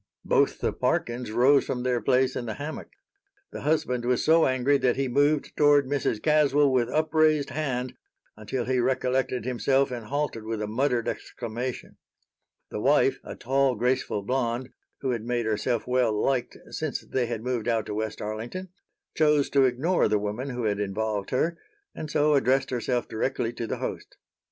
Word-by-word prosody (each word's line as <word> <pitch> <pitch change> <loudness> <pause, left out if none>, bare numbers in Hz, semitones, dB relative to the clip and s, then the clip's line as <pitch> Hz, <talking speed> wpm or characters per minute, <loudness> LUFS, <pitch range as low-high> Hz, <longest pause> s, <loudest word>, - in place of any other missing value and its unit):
Both - - +2
the - - 0
Parkins 120 -1 -1
rose 130 +5 +4
from 125 -1 -3
their 125 -1 0
place 130 0 +2
in 120 - -4
the 110 - -4
hammock. 150 +2 -6 0.6
The - - -7
husband 140 -5 0
was 125 0 +1
so 160 +1 +5
angry 130 +2 +2
that 125 -2 +2
he 135 0 -1
moved 145 +4 +1
toward 145 -1 +5
Mrs. 135 -5 -1
Caswell 150 -2 +4
with 120 -2 +2
upraised 155 -1 +2
hand 130 -5 -2 0.4
until 115 +4 -4
he 130 0 +1
recollected 130 -1 0
himself 135 +2 +1
and 120 -3 -6
halted 145 -5 -2
with 110 0 -4
a 105 - -2
muttered 120 +2 0
exclamation. 120 +1 -5 0.7
The - - -4
wife, - - +3
a - - -8
tall, 135 0 +1
graceful 125 -3 0
blonde, 125 +1 -1 0.3
who 130 - 0
had 120 -3 -2
made 120 0 -1
herself 110 +2 -1
well 125 -2 +2
liked 130 0 0
since - - -3
they 125 -2 -2
had 115 -2 -4
moved 125 -2 -2
out 115 -3 +1
to - - -5
West 110 0 -3
Arlington, 115 - -5 0.4
chose 150 -2 +2
to 135 -1 +5
ignore 135 +9 +2
the 105 - +2
woman 105 +6 -3
who 125 -2 -4
had 105 -2 0
involved 105 0 -2
her, 165 +6 0 0.3
and 155 - -6
so 150 +1 +2
addressed 135 -1 +2
herself 125 0 -1
directly 115 +1 -2
to 115 -1 -5
the - - -3
host. - - -6
125 Hz, 175 wpm, -26 LUFS, 115-140 Hz, 0.7 s, so